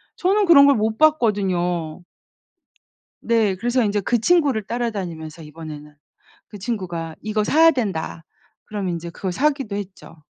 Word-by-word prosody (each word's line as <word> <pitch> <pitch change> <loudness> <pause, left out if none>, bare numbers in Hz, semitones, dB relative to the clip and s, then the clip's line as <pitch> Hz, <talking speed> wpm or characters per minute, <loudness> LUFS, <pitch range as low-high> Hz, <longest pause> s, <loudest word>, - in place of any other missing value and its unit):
저는 395 +3 +2
그런 285 -5 +8
걸 280 -1 +5
못 220 0 -1
봤거든요. 185 - +1 1.2
네. 220 -5 +1
그래서 240 +5 0
인제 205 -1 0
그 240 +5 +1
친구를 285 -6 +2
따라다니면서 180 -9 -5
이번에는 150 -1 -10 0.5
그 205 - -10
친구가 175 -7 -4
"이거 215 0 -1
사야 325 +7 +5
된다." 195 - -3 0.4
그러면 200 -4 -4
인제 170 0 -6
그거 185 +2 -5
사기도 270 - -1
했죠. 185 -6 -9
205 Hz, 300 characters per minute, -21 LUFS, 170-245 Hz, 1.2 s, 그런